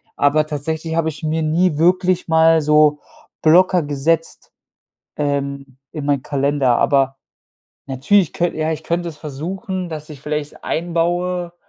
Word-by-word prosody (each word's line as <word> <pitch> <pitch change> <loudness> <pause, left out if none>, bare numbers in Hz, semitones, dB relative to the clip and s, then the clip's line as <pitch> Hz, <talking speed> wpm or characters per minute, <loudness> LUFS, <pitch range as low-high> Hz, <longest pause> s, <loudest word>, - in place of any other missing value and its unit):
Aber 150 +2 +2
tatsächlich 160 +2 -4
habe 165 -1 +1
ich 155 -1 -10
mir 160 +1 -1
nie 160 +1 +1
wirklich 180 +1 +2
mal 160 0 +4
so 150 0 +4 0.4
Blocker 180 +2 +5
gesetzt, 150 +3 -2 0.7
ähm, 140 -2 -3
in 150 -3 -6
meinen 140 -2 +1
Kalender. 140 -3 +1
Aber 135 -1 +2 0.7
natürlich 145 +8 +1
könn 175 0 -1
ja, 155 0 -1
ich 160 -1 -4
könnte 170 +1 -2
es 160 - -9
versuchen, 180 +6 -5
dass 155 -1 -8
ich 145 -3 -10
vielleicht 150 0 -5
einbaue, 175 +1 -1
155 Hz, 140 wpm, -19 LUFS, 145-170 Hz, 0.7 s, Blocker